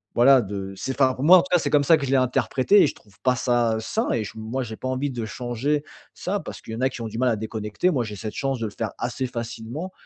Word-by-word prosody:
voilà, 130 +2 +6
de 100 -2 -5
c'est 130 +8 -3
enfin, 130 -1 +5
pour 130 - -5
moi, 180 +5 +9
en - - +3
tout 185 - -9
cas, - - +7
c'est - - -1
comme 145 -1 +4
ça 165 - +7
que 140 - -3
je 130 - -3
l'ai 135 - +4
interprété, 130 +8 +3
et - - +4
je - - -4
trouve 100 -2 -22
pas 130 -1 +3
ça, 120 -3 +1
heu, - - -3
sain 220 - -1
et 115 - 0
j - - -7
moi 110 +4 -3
j'ai 110 -2 -6
pas 130 - -5
envie 130 +2 -1
de 120 -3 -4
changer 125 +6 -2 0.3
ça - - -2
parce - - -8
qu'il 110 - -8
y - - -5
en 125 - -5
a 130 - +3
qui 125 - -8
ont 115 - -3
du 110 - -7
mal 130 0 +3
à 110 - 0
déconnecter. 110 - -2
Moi, 125 -7 0
j'ai 105 -1 -6
cette 105 +3 -6
chance 135 -3 -1
de 115 - -2
le 105 - -8
faire 110 -2 -4
assez 130 +2 -2
facilement 120 +8 -6
125 Hz, 310 wpm, -24 LUFS, 110-135 Hz, 0.3 s, moi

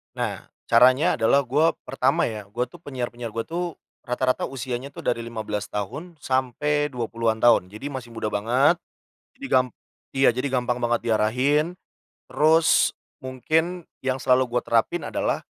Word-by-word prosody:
Nah, - - -3 0.2
caranya 125 +5 +5
adalah 115 +4 +3
gua 150 +6 +3 0.2
pertama 135 0 +1
ya, 110 -2 -5
gua 120 +3 -1
tuh - - -16
penyiar-penyiar 120 -4 -5
gue 115 +1 -3
tuh 170 +2 -2 0.4
rata-rata 130 0 0
usianya 130 +1 -4
tuh - - -11
dari 115 -1 0
15 110 -3 -5
tahun 150 - -5
sampai 145 +3 0
20-an 115 -2 -1
tahun, 110 -6 +4
jadi 110 +7 -7
masih 130 -4 -7
muda 115 -1 -3
banget, 120 +10 +3 0.6
jadi 275 - -7
gam 130 0 +4 0.5
iya, 135 0 +4
jadi 125 +3 0
gampang 125 -1 0
banget 120 0 +1
diarahin, 130 +9 +2 0.5
terus 160 +2 +3 0.2
mungkin 160 +7 -1 0.2
yang 130 -1 -1
selalu 130 -1 +2
gua - - +4
terapin 145 +8 +1
adalah - - -2
125 Hz, 145 wpm, -24 LUFS, 115-145 Hz, 0.6 s, caranya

